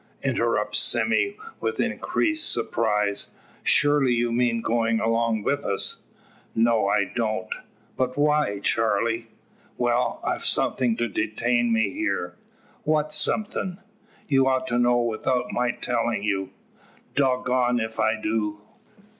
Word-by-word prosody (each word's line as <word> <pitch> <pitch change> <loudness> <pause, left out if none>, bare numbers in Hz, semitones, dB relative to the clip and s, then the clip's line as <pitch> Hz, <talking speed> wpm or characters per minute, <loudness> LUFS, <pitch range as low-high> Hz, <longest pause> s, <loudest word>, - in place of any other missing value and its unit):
interrupts - - +1
Sime 410 -1 +2 0.2
with 450 - -3
increased 315 -1 +1
surprise, 105 -3 0 0.3
"Surely 145 -3 +3
you 120 0 0
mean 120 -1 +1
goin' 115 0 +1
along 115 -1 0
wi' - - +1
us?" 140 -9 -2 0.5
"No, 115 -2 +3
I 100 0 +3
don't." 110 -4 -2 0.5
"But 130 0 -1
why, 150 -9 +1
Charley?" 115 +1 0 0.5
"Well, 120 0 0
I've - - -1
something 120 -4 +1
to 120 - 0
detain 120 +2 0
me 110 -3 +2
here." - - -2 0.5
"What 155 0 0
somethin'?" 180 +3 0 0.5
"You 135 -2 +3
ought 130 -1 +1
to 120 - +1
know 120 0 +3
without 125 +2 -1
my 125 0 0
telling 120 -3 -1
you." 95 -2 -1 0.6
"Dog 130 -2 +1
goned 125 -1 +2
ef 110 0 -4
I 110 0 +2
do." 110 -1 -2
120 Hz, 125 wpm, -25 LUFS, 110-130 Hz, 0.6 s, Surely